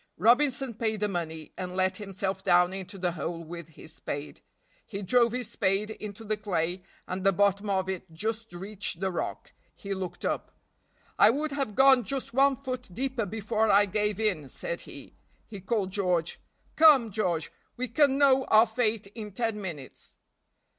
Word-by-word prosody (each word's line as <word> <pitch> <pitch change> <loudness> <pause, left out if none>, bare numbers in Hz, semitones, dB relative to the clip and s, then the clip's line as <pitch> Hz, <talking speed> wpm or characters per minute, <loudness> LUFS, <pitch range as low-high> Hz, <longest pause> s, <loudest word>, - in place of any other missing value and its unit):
Robinson 250 - +3
paid 220 -1 -1
the 210 - +1
money, 160 -4 -5
and 180 -1 -5
let 185 0 +1
himself 195 -1 -4
down 180 -1 +4
into 195 +1 -7
the 180 -1 0
hole 170 0 -4
with 170 0 -8
his 160 0 -14
spade. 145 -2 -6 0.4
He 200 -2 -6
drove 235 +4 +4
his 250 +1 -3
spade 200 +1 0
into 210 0 -8
the 215 0 -1
clay, 180 -3 -1 0.3
and 185 +1 -4
the 195 - +5
bottom 200 +1 +1
of 190 -1 0
it 190 -3 -5
just 220 +6 -4
reached 190 0 -4
the 190 0 -1
rock; 175 - -5 0.2
he 200 0 -5
looked 185 -2 -5
up. - - -3 0.6
"I 205 - +8
would 295 +6 0
have 275 -7 -3
gone 265 -1 +6
just 265 +2 -3
one 275 +2 +4
foot 255 -3 -6
deeper 255 +1 -2
before 220 +1 0
I 205 0 +6
gave 210 +1 -1
in," 180 -11 0
said - - -5
he; - - -11 0.3
he 205 -4 -9
called 195 -1 -1
George. 180 -4 0 0.4
"Come, 285 -8 +6
George, 180 -6 -1 0.3
we 255 +1 -2
can 275 +3 +3
know 270 -2 +4
our 220 +1 +6
fate 220 -2 -1
in 215 -2 -7
ten 225 -1 -2
minutes." 155 -9 -8
205 Hz, 175 wpm, -28 LUFS, 185-230 Hz, 0.6 s, I